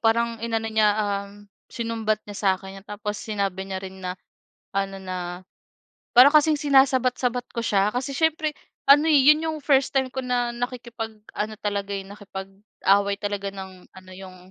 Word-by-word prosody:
parang 230 0 +1
inano 225 -1 -1
niya, 220 -1 +3
um, 200 -1 -1 0.4
sinumbat 225 -2 -1
niya 205 - -8
sa'kin 195 -1 -1
yun - - -37
tapos 210 0 -4
sinabi 200 -3 -3
niya 190 -1 -3
rin 190 0 -9
na 180 0 -4 0.6
ano, 195 0 -1
na 185 -1 -5 1.0
parang 255 +5 +9
kasing 305 0 +5
sinasabat-sabat 255 -3 +2
ko 235 - -1
siya. 200 -1 +2
Kasi 260 +3 -2
siyempre 315 -1 +1 0.4
ano, 295 +3 +7
eh, 300 -3 +6
yun 300 +3 +6
yung 315 -1 -2
first 275 -2 +2
time 265 -1 +1
ko 265 - -7
na 245 -1 0
nakikipag 240 -2 -5 0.2
ano 215 +1 -3
talaga, 200 -1 -2
eh, 195 - -3
nakipag-away 200 0 -1
talaga 205 -1 -2
ng 190 -1 -10
ano 185 -1 -15
yung, 185 0 -11
215 Hz, 160 wpm, -24 LUFS, 195-250 Hz, 1.0 s, parang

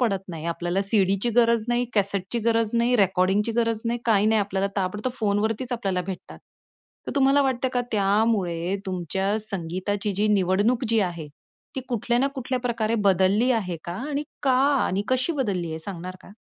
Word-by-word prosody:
पडत 200 -6 +1
नाही. 165 -3 -7
आपल्याला 175 +2 -1
सीडीची 200 +2 +2
गरज 230 -2 +4
नाही, 240 +1 +1
कॅसेटची 200 +1 0
गरज 225 -1 +2
नाही, 235 +1 +3
रेकॉर्डिंगची 195 +2 +2
गरज 230 -2 +1
नाही, 235 +1 -1
काही 215 -3 +3
नाही. 220 0 +3
आपल्याला 195 0 -1
ताबडतोब 210 +6 -2
फोनवरतीच 220 +4 0
आपल्याला 195 -6 -1
भेटतात. 190 -2 -7 0.7
तर - - -3
तुम्हाला 275 0 +4
वाटतं 260 -1 0
का 245 - +1
त्यामुळे 195 -4 +1
तुमच्या 190 +3 -1
संगीताची 195 +1 -3
जी 210 +2 +2
निवडणूक 205 +5 +2
जी 230 0 +2
आहे 170 -5 -3 0.5
ती 265 - -1
कुठल्या 240 0 0
ना 270 - +3
कुठल्या 260 -1 -2
प्रकारे 230 -2 -1
बदलली 195 +6 +3
आहे 190 -7 -1
का? 170 - -5 0.2
आणि 290 0 -1 0.2
का 270 -2 +3 0.3
आणि 195 +2 -1
कशी 255 +5 +1
बदलली 200 - -1
आहे 160 - -4
सांगणार 185 +1 -7
का? - - -15
205 Hz, 170 wpm, -24 LUFS, 190-235 Hz, 0.7 s, गरज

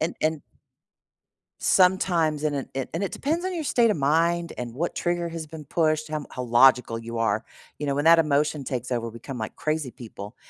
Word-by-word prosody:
and 160 - -1
and 155 -1 0 1.2
Sometimes 175 -5 +3
and 150 -2 0
it, 135 - -4
it, 135 -1 -3
and 165 - -2
it 195 - -4
depends 325 +5 -1
on 375 - -2
your 330 - -2
state 235 -5 +3
of - - +1
mind 165 +4 +1
and 120 -2 -5
what 170 +7 -2
trigger 175 -1 -1
has 165 -1 -6
been 155 0 -9
pushed, 155 +1 0
how 155 - -2
m 150 - -5
how 125 - -5
logical 120 -1 +4
you 115 0 -6
are, 110 -2 +1 0.3
you 150 - -3
know, 140 - 0
when 145 - -1
that 165 0 +8
emotion 150 -2 +1
takes 125 -2 -4
over, 115 -1 -1
we 115 +1 -10
come 130 +1 -7
like 110 -1 -5
crazy 155 -4 -2
people 110 -2 -10
150 Hz, 215 wpm, -25 LUFS, 125-170 Hz, 1.2 s, that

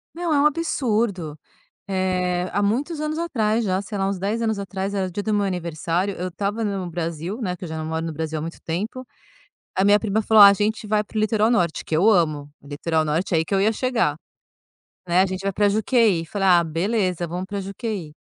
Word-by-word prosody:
Não, 340 -2 -1
é 290 - +3
um - - +3
absurdo. 225 - 0 0.5
Eh, 180 -1 0
há 205 +2 0
muitos 275 +10 -1
anos 305 +1 -2
atrás 230 -9 0
já, 190 -2 0
sei 205 +1 -6
lá, 195 0 0
uns 195 -1 -2
10 210 +5 -1
anos 220 -2 0
atrás, 195 0 -4
era 190 -2 -1
dia 205 +4 -4
do 215 - -1
meu 205 -1 +2
aniversário, 175 +1 -2
eu 180 +1 -3
estava 200 +5 -3
no 195 -4 -2
Brasil, 170 +6 -4
né, 180 -5 -2
que 180 - -9
eu 175 - -6
já 160 0 -5
não 155 - -4
moro 160 0 -2
no 165 - -3
Brasil 160 0 -3
há - - -4
muito 165 +1 -7
tempo, 215 +10 -4 0.7
a 190 - +1
minha 205 +1 +6
prima 215 0 0
falou: 220 0 +6
"A 200 0 +10
gente 215 +2 -1
vai 210 0 +2
para 215 - -13
o 215 - +2
litoral 215 0 +2
norte," 175 -9 +1
que 155 - -1
eu 195 +7 +4
amo 155 -7 +1
litoral 155 +3 -1
norte, 165 +4 -1
aí 160 - +3
que 195 - -3
eu 195 - +3
ia 215 +3 +3
chegar, 230 - 0 0.9
né. 175 +2 +4
"A 195 - +2
gente 185 0 -4
vai 195 0 -1
pra 205 +2 +2
Juqueí", 215 -5 +2
falei: 195 +2 -1
"Ah, 175 -2 +6
beleza, 180 +1 -1
vamos 180 +3 -4
pra 200 0 -4
Juqueí." 195 -4 -5
195 Hz, 225 wpm, -23 LUFS, 170-215 Hz, 0.9 s, A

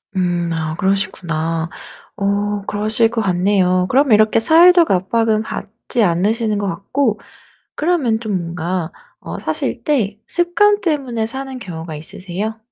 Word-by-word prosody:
음 175 -2 0
아 160 -1 -3
그러시구나. 165 -4 -1 0.5
어 205 0 -1
그러실 215 +2 +2
것 230 -1 -2
같네요. 185 -1 +2
그럼 270 -1 +3
이렇게 215 +1 +5
사회적 340 +6 +6
압박은 215 +4 +1
받지 225 +2 -3
않으시는 210 +5 +1
것 200 -1 -2
같고 210 +6 -1 0.6
그러면 295 -9 +1
좀 210 -5 -2
뭔가 170 0 -3 0.3
어 - - -7
사실 - - -2
때 220 -9 0
습관 410 +4 +2
때문에 265 -9 -1
사는 265 +1 -5
경우가 165 -6 -7
있으세요? 190 +7 -5
210 Hz, 280 characters per minute, -18 LUFS, 180-240 Hz, 0.6 s, 사회적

